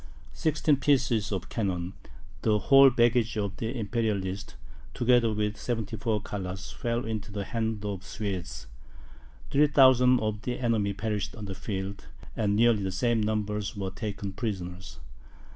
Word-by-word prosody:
Sixteen 155 -2 +2
pieces 125 -6 +2
of 95 -3 -3
cannon, 95 -4 -2 0.5
the 105 -1 +3
whole 135 +5 +7
baggage 120 -2 +2
of 100 -1 -2
the 115 +3 -3
Imperialists, 100 -4 -2 0.4
together 120 -2 +3
with 105 0 -1
74 110 -2 -2
colours, 95 -2 -5
fell 120 0 -2
into 110 -2 -4
the 100 0 -3
hands 110 -2 -2
of 100 -2 -3
the 95 - -18
Swedes; 95 - -4 0.9
3,000 130 -4 +5
of 110 -2 -2
the 125 +1 -3
enemy 110 -5 +1
perished 105 0 -3
on 110 -3 -7
the 95 - -5
field, 95 0 -5 0.3
and 105 -2 +1
nearly 115 -1 +4
the 95 -1 -2
same 115 +4 +1
number 105 -1 -1 0.2
were 95 -1 -3
taken 100 -1 -5
prisoners. 90 - -5
105 Hz, 145 wpm, -28 LUFS, 100-120 Hz, 0.9 s, whole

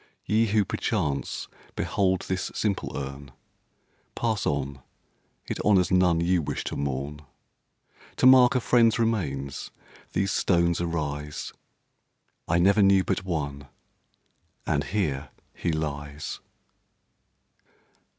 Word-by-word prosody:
Ye! 110 +3 +2
who 105 0 +2
perchance 80 -10 -2 0.3
behold 95 -2 +1
this 95 -1 -2
simple 100 -3 -1
urn, 70 0 -6 0.9
Pass 110 -4 -1
on 70 -1 -2 0.6
it - - -4
honors 95 -4 +4
none 90 -2 +4
you 90 0 +2
wish 70 -1 -3
to - - -4
mourn; 70 +1 -3 0.9
To - - +1
mark 130 -1 +7
a 125 - +2
friend's 115 -1 +4
remains 75 - -2 0.4
these 100 0 +1
stones 85 -2 +2
arise 75 -3 -3 0.9
I 85 - +2
never 100 +4 +4
knew 95 -1 +5
but 95 -1 -1
one, 70 -6 -3 1.0
and - - 0
here 75 -9 -1 0.2
he 85 - -2
lies. 75 -1 -4
85 Hz, 110 wpm, -26 LUFS, 70-100 Hz, 1.0 s, mark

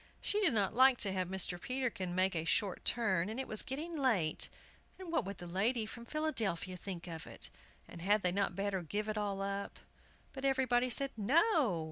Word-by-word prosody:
She 420 - -1
did 345 - +3
not 200 -1 +1
like 260 +2 +6
to 200 - +5
have 185 -1 -1
Mr. 185 -1 +1
Peterkin 250 -9 -2
make 185 0 +2
a 160 - -1
short 185 +3 0
turn, 195 -6 +1
and 225 +4 -4
it 265 - -3
was 215 - +4
getting 310 +6 -4
late, 225 - +2 0.5
and 370 -3 -8
what 335 - +1
would 200 +1 -6
the 175 - -8
lady 215 +7 0
from 235 +2 -9
Philadelphia 225 - 0
think 180 -1 -6
of 165 -2 -8
it, - - -9 0.4
and 170 - -11
had 205 +3 +2
they 180 - +2
not 195 -1 -1
better 195 -1 -1
give 205 +6 -3
it 215 - -2
all 200 -2 -2
up? 200 0 -4 0.6
But 265 - -8
everybody 255 -2 +2
said 275 +3 0
"No!" 265 - +3
210 Hz, 200 wpm, -34 LUFS, 185-260 Hz, 0.6 s, like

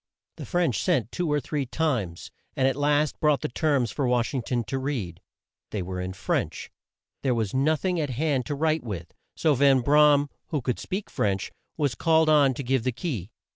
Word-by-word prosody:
The - - -7
French 175 - +1
sent 130 - +1
two 175 -4 -1
or 150 - +2
three 145 0 -3
times, 120 - -2 0.2
and 130 - +2
at 135 - +1
last 145 +1 +1
brought 150 -4 +2
the - - -2
terms 135 -4 +1
for 135 +3 -1
Wash 125 0 +1
ing 130 - -1
ton 120 0 -1
to 135 +6 -3
read. 120 - -4 0.5
They 100 -4 -3
were 90 0 -4
in 90 0 -4
French. - - -2 0.5
There 130 -3 +1
was 110 -4 -1
no 140 +4 +3
thing 180 +2 -1
at 150 -3 -1
hand 135 0 0
to 145 - -2
write 155 +1 +1
with, 90 -7 -6 0.2
so 155 - +3
Van 135 -1 +4
Bra 150 +3 +6
am, 145 0 -1 0.2
who 150 - -1
could 125 -1 -2
speak 195 +2 -5
French, 95 -2 -1 0.3
was 145 -5 +1
called 160 +5 +3
on 145 -4 +5
to 140 - -4
give 130 0 +1
the 130 - +1
key. 120 - -4
135 Hz, 210 wpm, -26 LUFS, 120-150 Hz, 0.5 s, Bra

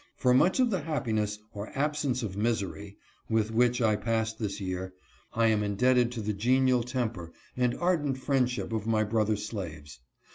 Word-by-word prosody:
For 125 -1 +3
much 180 - +4
of 250 -3 +3
the 190 - +1
happiness, 110 -9 -1 0.2
or 105 0 -6
absence 145 -3 0
of 100 -4 -4
misery, 105 -2 -2 0.3
with 110 -1 +1
which 120 +1 +2
I 110 -2 +3
passed 110 0 -1
this 105 -3 -3
year, 95 -1 -4 0.4
I 115 0 +3
am 110 -2 +3
indebted 120 +4 +2
to 115 - -4
the 105 0 -2
genial 125 +4 +3
temper 115 -8 -3 0.2
and 125 -1 +1
ardent 160 -7 0
friendship 125 -3 0
of 110 -1 -2
my 110 -1 +2
brother 110 0 +1
slaves. 85 - -7
115 Hz, 170 wpm, -29 LUFS, 105-125 Hz, 0.4 s, much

